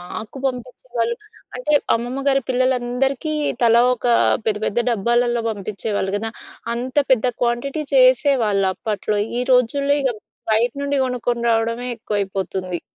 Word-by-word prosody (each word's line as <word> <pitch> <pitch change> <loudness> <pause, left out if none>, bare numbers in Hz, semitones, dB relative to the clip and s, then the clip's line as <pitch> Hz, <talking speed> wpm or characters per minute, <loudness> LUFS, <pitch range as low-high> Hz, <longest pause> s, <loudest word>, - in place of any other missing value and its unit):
మాకు 215 +8 -8
పంపించేవాళ్ళు 245 -2 -3 0.4
అంటే 275 +4 -2 0.2
అమ్మమ్మ 245 +3 -3
గారి 270 0 +3
పిల్లలందరికీ 255 +3 0 0.3
తలా 235 0 +5
ఒక 250 - -20 0.4
పెద్ద, 210 -1 +1
పెద్ద 210 - -1
డబ్బాలలో 240 +2 +1
పంపించేవాళ్ళు 205 -1 -3
కదా! 225 +2 -3 0.5
అంత 250 +2 -5 0.2
పెద్ద 255 -2 +4 0.2
క్వాంటిటీ 245 +5 -1
చేసేవాళ్ళు 255 -6 +4
అప్పట్లో. 210 -1 -2 0.2
ఈ - - +1
రోజుల్లో 280 +4 +3
ఇగ 260 -3 +1 0.4
బయట 230 +3 +2
నుండి 280 0 0
కొనుక్కొని 245 -1 -2
రావడమే 230 +2 0
ఎక్కువైపోతుంది. 190 -4 -3
240 Hz, 120 wpm, -21 LUFS, 215-255 Hz, 0.5 s, తలా